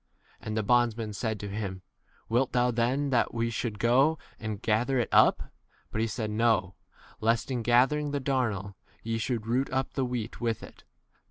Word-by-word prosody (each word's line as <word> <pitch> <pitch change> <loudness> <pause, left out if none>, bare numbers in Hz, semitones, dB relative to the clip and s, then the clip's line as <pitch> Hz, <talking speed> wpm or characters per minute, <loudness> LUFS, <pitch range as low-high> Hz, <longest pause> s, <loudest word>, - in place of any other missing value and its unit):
And 110 0 -4
the 110 - +1
bondsmen 115 -1 +2
said 110 +1 -2
to 105 - -4
him, 100 -2 -5 0.4
Wilt 120 +3 +1
thou 125 0 +3
then 130 +5 0
that 120 -2 +1
we 115 0 0
should 115 -1 -3
go 135 +8 +3 0.2
and 110 -2 -4
ga 110 +1 +2
29 - - -7
ther 135 -1 +1
it 120 - 0
[up]? - - +4 0.4
But 110 - -1
he 115 - +1
said, 110 -1 -3
No; 110 -4 +2 0.5
lest 115 +1 +1
b - - -1
[in] 120 - -1
gathering 130 +6 +3
the 145 0 -1
darnel 120 -8 -1 0.3
ye 115 0 -2
should 115 -2 -2
root 125 +4 0
up 130 0 -1
the 135 - 0
wheat 125 -2 -4
with 115 -2 -1
30 - - -9
it. - - -23
115 Hz, 200 wpm, -28 LUFS, 110-125 Hz, 0.5 s, up